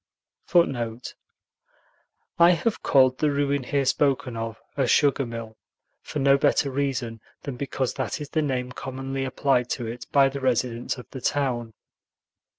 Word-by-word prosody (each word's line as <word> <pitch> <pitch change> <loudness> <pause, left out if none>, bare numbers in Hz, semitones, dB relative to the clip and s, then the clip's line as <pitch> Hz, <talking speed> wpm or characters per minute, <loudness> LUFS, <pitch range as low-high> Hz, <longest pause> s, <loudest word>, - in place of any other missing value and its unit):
[Footnote 125 -9 +1 1.2
1: 170 0 +7
I - - +7
have 210 +7 -1
called 130 -2 +4
the 150 - +2
ruin 140 0 +1
here 140 +1 0
spoken 130 -3 +1
of 115 -1 -5 0.2
a 135 -3 +1
"sugar 140 0 +3
mill" 115 -1 -7 0.4
for - - -6
no 140 0 +4
better 140 0 +2
reason 130 -5 -2 0.2
than 140 - -5
because 135 -1 -2
that 130 - -3
is 150 -1 -6
the 155 - 0
name 130 -4 -2
commonly 135 +1 -4
applied 130 -2 +1
to 120 - -2
it 115 +2 -6
by 140 -1 +5
the 135 0 -5
residents 125 -1 0
of 125 - -10
the 130 - -7
town. 120 -6 -1
135 Hz, 155 wpm, -25 LUFS, 120-140 Hz, 1.2 s, 1